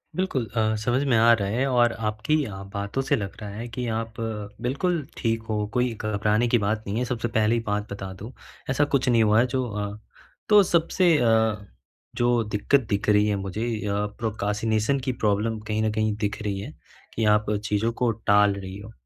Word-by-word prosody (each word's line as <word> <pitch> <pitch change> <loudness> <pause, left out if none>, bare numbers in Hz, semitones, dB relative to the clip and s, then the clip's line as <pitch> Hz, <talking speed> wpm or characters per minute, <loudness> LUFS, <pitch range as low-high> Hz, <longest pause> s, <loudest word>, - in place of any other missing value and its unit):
बिल्कुल 180 -10 -1
अ, 110 -1 +2
समझ 120 +5 0
में 135 -4 +2
आ 115 +1 +6
रहा 100 -4 0
है 125 +5 0
और 120 -2 +3
आपकी 105 +8 0 0.4
बातों 100 +6 -2
से 135 +2 +1
लग 100 -6 -5
रहा 105 - -6
है 110 +4 -6
कि 120 +1 -5
आप 115 0 -6 0.5
बिल्कुल 150 +5 -1
ठीक 115 -1 0
हो, 105 -2 -2
कोई 125 -1 +1
घबराने 110 +2 0
की 120 - +3
बात 110 0 -1
नहीं 100 +3 -2
है। 125 - 0
सबसे 120 -1 -2
पहली 110 +2 +3
बात 105 0 -2
बता 95 -1 -6
दूँ 110 +5 -8 0.4
ऐसा 135 +2 +2
कुछ 135 0 +1
नहीं 115 -2 +4
हुआ 105 +1 +4
है 120 - +4
जो 130 -1 +1
अ, 105 0 -4 0.5
तो 210 -1 +8
सबसे 170 -1 +3
अ, 110 -3 +3 0.6
जो 120 -1 +2
दिक्कत 105 +6 +1
दिख 100 +1 0
रही 105 0 +4
है 105 - +1
मुझे 100 +3 -3 0.2
अ, 100 - 0 0.3
प्रोक्रेस्टिनेशन 110 +3 0
की 130 - +3
प्रॉब्लम 105 +2 +1
कहीं 110 0 0
न 110 - +1
कहीं 110 0 0
दिख 105 +2 -3
रही 100 -2 -2
है - - -7 0.4
कि 110 - 0
आप 105 0 -1
चीज़ों 105 +2 0
को 120 - +3
टाल 105 -2 +3
रही 95 -1 -7
हो। 105 +2 -10
110 Hz, 200 wpm, -25 LUFS, 105-120 Hz, 0.6 s, तो